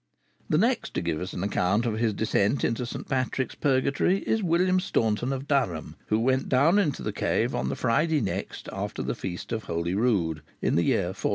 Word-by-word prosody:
The - - +3
next - - +1
to - - 0
give 85 -1 -1
us 90 +1 -4
an 90 - -3
account 100 +3 +1
of 110 -2 -1
his 115 -2 +2
descent 110 +3 +1
into 120 +1 0
St. - - -6
Patrick's 130 -1 -1
Purgatory 140 +7 +1
is 220 - +1
William 185 +1 +2
Staunton 115 - 0
of 135 +1 -4
Durham, 95 - 0
who 110 - +2
went 130 +3 +1
down 150 +10 +4
into 155 -9 0
the - - -2
cave - - 0
on 65 - -1
the 70 - -2
Friday 155 +6 +2
next 100 - -4
after - - -4
the - - -1
feast 90 -2 -6
of 110 -3 -3
Holyrood, 85 -1 0 0.2
in - - 0
the 85 - +3
year 90 -2 +2
1409. 95 - -2
115 Hz, 200 wpm, -27 LUFS, 95-140 Hz, 0.2 s, down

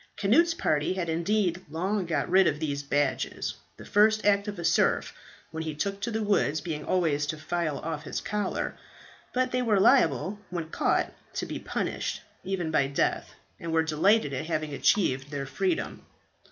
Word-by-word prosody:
Cnut's 330 +12 +4
party 155 - +1
had 180 -3 -3
indeed 180 +2 0
long 185 +4 -1
got 165 - 0
rid 190 +1 +5
of 150 - 0
these 145 -3 -2
badges, 140 -2 -1 0.2
the - - -11
first 215 +1 +3
act 200 0 +3
of 205 -1 -4
a 170 - -4
serf - - +2 0.4
when 160 0 -4
he 160 -2 -4
took 200 +5 -2
to 235 - -1
the 220 -1 -1
woods 180 -7 +2
being 150 -1 -4
always 155 -5 +1
to 155 - -3
file 155 -1 -2
off 160 -1 -4
his 155 - -4
collar; 210 -2 -2 0.6
but 255 0 0
they 250 - +1
were 220 -5 +3
liable 185 - +3
when 170 -3 -4
caught - - +1 0.2
to - - -2
be - - -5
punished, - - -3 0.2
even 180 -4 -2
by 140 -3 +3
death, 140 - -1 0.2
and 170 - -5
were 160 0 +3
delighted 160 +2 +2
at 130 +4 -3
having 155 -3 -2
achieved 140 - +2
their 140 -2 -4
freedom. 350 - -2
170 Hz, 180 wpm, -28 LUFS, 150-205 Hz, 0.6 s, rid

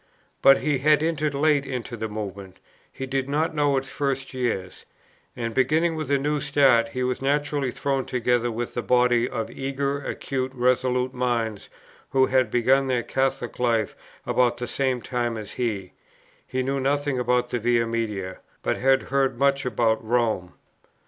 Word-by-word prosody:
But 135 0 +6
he 145 -3 +1
had 150 +2 +4
entered 155 -3 0
late 145 0 +3
into 125 -3 -5
the 110 -1 -3
Movement; 100 -3 -7 0.3
he 135 - -6
did 135 0 -2
not 155 +3 0
know 145 -2 +2
its 135 0 -3
first 135 -1 -2
years; 115 -8 -3 0.5
and, 115 -1 -3
beginning 155 +6 +2
with 155 -2 -4
a 140 - +3
new 145 +1 -1
start, 135 -5 +4
he 125 +2 -3
was 125 +1 -1
naturally 145 0 0
thrown 135 +1 -1
together 120 -1 +1
with 120 +1 -4
that 120 - -2
body 125 -1 +3
of 115 - -4
eager, 140 +1 -2
acute, 130 -1 -3
resolute 125 0 +1
minds 115 -4 -2 0.4
who 130 -1 +4
had 130 -3 +2
begun 130 +4 +3
their 125 -2 0
Catholic 135 -1 -2
life 115 -4 +1 0.3
about 120 -1 +2
the 120 - -3
same 130 -1 -1
time 120 0 -2
as 105 -2 -7
he, 105 -7 -3 0.6
who 130 0 -1
knew 135 +1 -1
nothing 140 0 0
about 125 0 +1
the 120 - 0
Via 120 0 +2
Media, 105 -5 -3 0.2
but - - 0
had 135 +1 +3
heard 135 -2 0
much 140 0 +2
about 115 -3 +1
Rome. 110 -6 0
125 Hz, 170 wpm, -24 LUFS, 120-140 Hz, 0.6 s, But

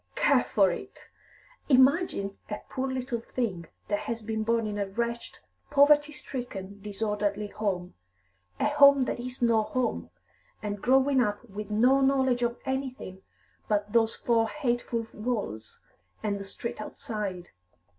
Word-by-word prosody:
"Care - - +4
for - - +3
it! - - -9 0.6
Imagine 260 - +3
a 210 - -3
poor 265 0 -2
little 255 -2 -2
thing 215 -8 -3 0.2
that 205 0 0
has 230 -1 -4
been 220 0 -2
born 230 +1 +1
in 205 -1 -3
a 200 - -1
wretched, 235 +4 -3 0.3
poverty 295 +1 +5
stricken, 205 -9 -7
disorderly 210 0 -2
home, 185 -5 -3 0.7
a - - +1
home 280 -2 +6
that 250 - -2
is 250 +1 -5
no 230 -2 +4
home, 250 +3 -2 0.5
and 205 -1 -3
growing 265 +2 +4
up 210 +1 -1
with 210 0 -7
no 250 +6 +4
knowledge 265 -2 +3
of 235 0 0
anything 265 -8 -4 0.5
but 205 0 0
those 225 -1 +3
four 225 -2 +1
hateful 240 -3 -1
walls 210 - -4 0.4
and 205 -2 -1
the 200 - -7
street 215 +3 -6
outside. 210 -6 -5
230 Hz, 140 wpm, -28 LUFS, 205-255 Hz, 0.7 s, home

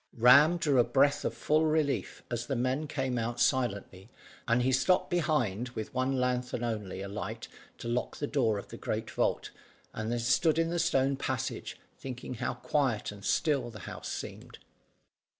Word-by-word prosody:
Ram 140 +8 +7
drew 150 -6 +2
a - - +7
breath 140 +3 +2
full 155 +1 +1
of 155 - +2
relief 155 -3 -1
as 120 0 -3
the 135 - -1
men 130 +5 0
came 135 -4 -1
out 120 +1 -3
silently, 100 -7 0 0.4
and 120 +1 +3
he 130 - +2
stopped 180 +9 +2
behind 125 - 0
with 110 - -5
one 130 +1 0
lanthorn 125 -1 -1
only 105 -5 -3
alight 100 +3 -5 0.3
to - - -7
lock 120 +1 -2
the 145 - -2
door 120 -8 +1
of 100 - -8
the - - -8
great - - -3
vault, - - 0 0.4
and 110 +1 -3
then 120 - 0
stood 130 +7 +2
in 165 0 +1
the 175 - 0
stone 135 -3 +2
passage, 130 -3 -3 0.2
thinking 130 -1 -6
how 120 - -3
quiet 130 -10 0
and 100 -1 -12
still 145 - +1
the 105 -4 -10
house - - -7
seemed. - - -7
125 Hz, 175 wpm, -30 LUFS, 115-145 Hz, 0.4 s, Ram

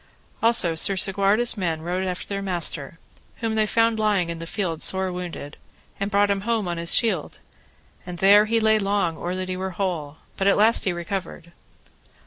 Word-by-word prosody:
Also 225 -7 +4
Sir 175 +4 +4
Segwarides' 200 +5 +2
men 165 -6 -3
rode 180 +2 -2
after 180 -1 -4
their 200 -1 -4
master, 170 -5 -3 0.4
whom 225 -2 -3
they 215 -1 +1
found 225 0 +1
lying 200 -5 +1
in 165 - -7
the 165 - -8
field 170 -5 -3
sore 190 -1 +2
wounded, 175 -5 -7 0.4
and 200 +1 -2
brought 200 0 +2
him 195 -1 -1
home 225 -2 -1
on 175 -1 -3
his 170 0 +3
shield, 200 -10 0 0.7
and 180 -1 -8
there 200 +3 +5
he 230 +1 +1
lay 220 0 +3
long 195 -4 -1
or 175 +3 -4
that 185 0 -4
he 185 - -3
were 190 +1 -4
whole, 160 -7 -3 0.2
but 195 - 0
at 200 - +5
the - - -1
last 220 +3 +3
he 190 - +1
recovered. 175 -1 -6
190 Hz, 195 wpm, -23 LUFS, 175-210 Hz, 0.7 s, there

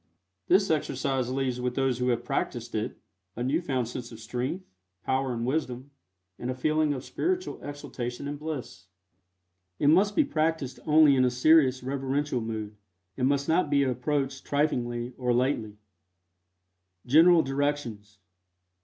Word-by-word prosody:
This 195 +1 +4
exercise 135 -4 -1
leaves 130 -1 -1
with 125 0 -2
those 135 -2 +1
who 125 - 0
have 120 -1 +1
practiced 120 -1 -3
it 110 0 -3 0.4
a 120 - -3
new 145 +7 +1
found 130 -8 -1
sense 125 0 -7
of 115 - -10
strength, 130 - -4 0.4
power 130 0 0
and 115 -1 -2
wisdom, 130 -1 -2 0.5
and 120 - -4
a 130 - -2
feeling 155 +3 +1
of 135 -2 -3
spiritual 365 +1 -2
exaltation 140 -3 -6
and 145 0 -5
bliss. 125 -11 -6 0.9
It 145 - +3
must 195 +6 +4
be 310 - +5
practiced 160 - -1
only 150 -2 +6
in 130 - +3
a 125 - +4
serious, 130 0 +4
reverential 135 0 -1
mood, 110 -2 -5 0.4
and 130 - +1
must 140 0 +1
not 165 -1 +2
be 140 -1 +3
approached 135 +1 -1
triflingly 125 -4 -1
or 125 -1 +1
lightly. 120 -5 0 1.3
GENERAL 165 +5 +6
DIRECTIONS. 135 -7 -2
135 Hz, 145 wpm, -27 LUFS, 125-150 Hz, 1.3 s, only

